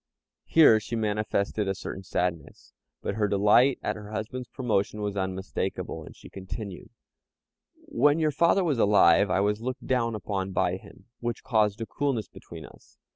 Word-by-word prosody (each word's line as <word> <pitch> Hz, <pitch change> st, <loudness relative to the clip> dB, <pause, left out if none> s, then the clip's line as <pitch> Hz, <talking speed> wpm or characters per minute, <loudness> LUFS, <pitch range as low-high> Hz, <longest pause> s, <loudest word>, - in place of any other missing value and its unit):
Here 145 Hz, -9 st, +6 dB
she 115 Hz, -, -5 dB
manifested 105 Hz, -1 st, -1 dB
a 95 Hz, -, -1 dB
certain 95 Hz, -, -7 dB
sadness, 90 Hz, -3 st, -4 dB, 0.3 s
but -, -, -2 dB
her 105 Hz, 0 st, 0 dB
delight 105 Hz, +7 st, +4 dB
at -, -, -1 dB
her 105 Hz, -1 st, -9 dB
husband's 110 Hz, +4 st, -5 dB
promotion 105 Hz, -5 st, -1 dB
was 105 Hz, -1 st, -3 dB
unmistakable, 95 Hz, 0 st, -3 dB
and -, -, -12 dB
she -, -, -14 dB
continued: 95 Hz, 0 st, -8 dB, 1.0 s
"When 145 Hz, +5 st, +3 dB
your 155 Hz, -2 st, +1 dB
father 170 Hz, +6 st, +3 dB
was 150 Hz, -8 st, 0 dB
alive, 100 Hz, -3 st, +5 dB
I 95 Hz, +1 st, +2 dB
was 105 Hz, +1 st, 0 dB
looked 130 Hz, +2 st, -5 dB
down 115 Hz, -3 st, 0 dB
upon 95 Hz, -2 st, -3 dB
by 90 Hz, 0 st, +1 dB
him, 95 Hz, 0 st, -16 dB
which 120 Hz, 0 st, -4 dB
caused 110 Hz, -2 st, +1 dB
a -, -, -2 dB
coolness 125 Hz, -6 st, -2 dB
between 80 Hz, -2 st, -11 dB
us. -, -, -18 dB
105 Hz, 165 wpm, -27 LUFS, 95-120 Hz, 1.0 s, Here